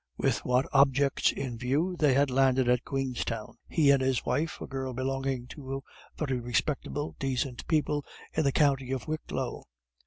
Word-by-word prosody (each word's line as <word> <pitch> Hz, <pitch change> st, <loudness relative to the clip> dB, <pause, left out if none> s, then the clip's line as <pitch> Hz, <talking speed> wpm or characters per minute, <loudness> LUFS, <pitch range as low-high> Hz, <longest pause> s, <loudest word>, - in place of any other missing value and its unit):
With -, -, +1 dB
which 125 Hz, +2 st, +2 dB
objects 140 Hz, 0 st, +4 dB
in 125 Hz, -4 st, -5 dB
view 145 Hz, +9 st, 0 dB
they 150 Hz, -6 st, +3 dB
had 140 Hz, -1 st, +3 dB
landed 130 Hz, -1 st, +3 dB
at 125 Hz, 0 st, +3 dB
Queenstown, 125 Hz, -5 st, -3 dB
he 150 Hz, -4 st, +4 dB
and 140 Hz, -1 st, +4 dB
his 130 Hz, -1 st, +1 dB
wife, 160 Hz, +2 st, -1 dB
a -, -, -5 dB
girl 130 Hz, -1 st, -4 dB
belonging 135 Hz, -1 st, -2 dB
to 135 Hz, -1 st, -6 dB, 0.3 s
very 135 Hz, -5 st, -1 dB
respectable, 140 Hz, +4 st, -2 dB
decent 130 Hz, -2 st, -2 dB
people 150 Hz, -2 st, +1 dB, 0.3 s
in 160 Hz, -, +1 dB
the 140 Hz, -, +3 dB
county 135 Hz, -3 st, +2 dB
Wicklow. 155 Hz, +4 st, -4 dB
135 Hz, 155 wpm, -29 LUFS, 130-145 Hz, 0.3 s, objects